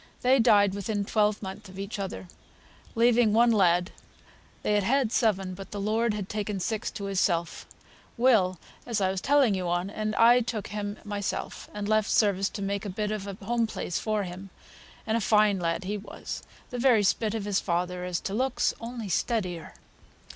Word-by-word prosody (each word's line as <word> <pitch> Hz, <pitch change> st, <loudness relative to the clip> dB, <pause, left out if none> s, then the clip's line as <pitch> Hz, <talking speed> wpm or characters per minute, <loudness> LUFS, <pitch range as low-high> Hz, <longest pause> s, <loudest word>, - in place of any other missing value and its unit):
They 260 Hz, +2 st, +5 dB
died 205 Hz, -4 st, +5 dB
within 200 Hz, +1 st, -2 dB
twelvemonth 210 Hz, -1 st, -1 dB
of 185 Hz, -, -12 dB
each 200 Hz, +2 st, -5 dB
other, 95 Hz, -, -5 dB, 0.7 s
leaving 230 Hz, -1 st, +4 dB
one 235 Hz, +1 st, +5 dB
lad 180 Hz, -3 st, +3 dB, 0.7 s
(they 210 Hz, -, +1 dB
had 205 Hz, -, +3 dB
had 250 Hz, +3 st, +1 dB
seven, 195 Hz, -6 st, +1 dB
but 195 Hz, +1 st, -9 dB
the 205 Hz, -, -6 dB
Lord 215 Hz, +2 st, +1 dB
had 200 Hz, -3 st, -4 dB
taken 210 Hz, -1 st, -3 dB
six 220 Hz, +4 st, -2 dB
to 200 Hz, -, -7 dB
Himself), 180 Hz, -4 st, -1 dB, 0.5 s
Will, 220 Hz, -7 st, +3 dB, 0.3 s
as 230 Hz, -3 st, 0 dB
I 190 Hz, -1 st, +1 dB
was 190 Hz, -1 st, -3 dB
telling 275 Hz, -6 st, +4 dB
you 185 Hz, -2 st, -2 dB
on; 175 Hz, +3 st, -1 dB
and 215 Hz, 0 st, -3 dB
I 240 Hz, +3 st, +6 dB
took 225 Hz, -3 st, -4 dB
him 205 Hz, 0 st, -4 dB
myself, 205 Hz, -2 st, -4 dB
and 205 Hz, -1 st, -4 dB
left 215 Hz, 0 st, +2 dB
service 200 Hz, -2 st, +2 dB
to 200 Hz, -, -6 dB
make 200 Hz, 0 st, -2 dB
a 205 Hz, -, -4 dB
bit 210 Hz, +2 st, -2 dB
on 200 Hz, -2 st, -5 dB
a -, -, -10 dB
home 235 Hz, +1 st, +1 dB
place 180 Hz, -, -3 dB
for 215 Hz, -2 st, -1 dB
him, 185 Hz, +2 st, -8 dB, 0.6 s
and 220 Hz, -, 0 dB
a -, -, -1 dB
fine 210 Hz, -2 st, +3 dB
lad 170 Hz, +2 st, -1 dB
he 205 Hz, +3 st, -3 dB
was, 200 Hz, -, -7 dB, 0.3 s
the 245 Hz, -, -4 dB
very 235 Hz, -4 st, +4 dB
spit 210 Hz, +4 st, +1 dB
of 215 Hz, -3 st, -3 dB
his 205 Hz, -2 st, +1 dB
father 180 Hz, 0 st, -2 dB
as 180 Hz, -1 st, -2 dB
to 195 Hz, -, -4 dB
looks, 255 Hz, +3 st, +1 dB
only 230 Hz, -2 st, -6 dB
steadier. 180 Hz, -3 st, -2 dB
205 Hz, 190 wpm, -27 LUFS, 190-225 Hz, 0.7 s, I